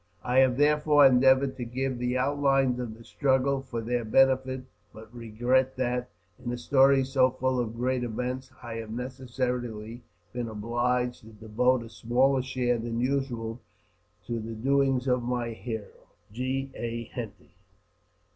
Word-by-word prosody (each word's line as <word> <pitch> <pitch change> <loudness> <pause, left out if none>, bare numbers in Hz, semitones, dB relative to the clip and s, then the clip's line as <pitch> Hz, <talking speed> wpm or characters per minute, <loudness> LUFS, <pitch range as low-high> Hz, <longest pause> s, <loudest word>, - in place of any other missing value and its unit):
I 125 +1 +3
have 130 -2 +4
therefore 150 0 +5
endeavoured 130 +1 +4
to 125 - -4
give 130 +1 -3
the 125 +1 0
outlines 135 -1 +2
of 115 -3 -5
the 115 - -14
struggle, 135 +2 +1
for 125 -3 -5
their 120 +1 -1
benefit; 130 +2 +2 0.3
but 110 +1 -13
regret 120 +3 0
that, 125 -1 -1 0.3
in 120 - -3
a 120 - -3
story 135 +2 +4
so 130 -1 +3
full 130 0 -1
of 115 -2 -2
great 125 +1 0
events, 125 +3 -4
I 115 -2 -6
have 110 -1 -6
necessarily 125 -2 -4 0.3
been 120 -1 -3
obliged 120 +3 -1
to 110 - -16
devote 115 +4 +1
a 115 - -10
smaller 130 +4 +2
share 125 -2 -1
than 115 0 -3
usual 125 -3 -2 0.6
to 115 -1 -3
the 115 +1 -6
doings 135 +2 +1
of 125 -1 +2
my 120 -1 -2
hero. 110 -2 -7 0.3
G. 130 +3 -2
A. 115 0 -4
Henty. 115 -5 -7
125 Hz, 150 wpm, -28 LUFS, 115-130 Hz, 0.6 s, therefore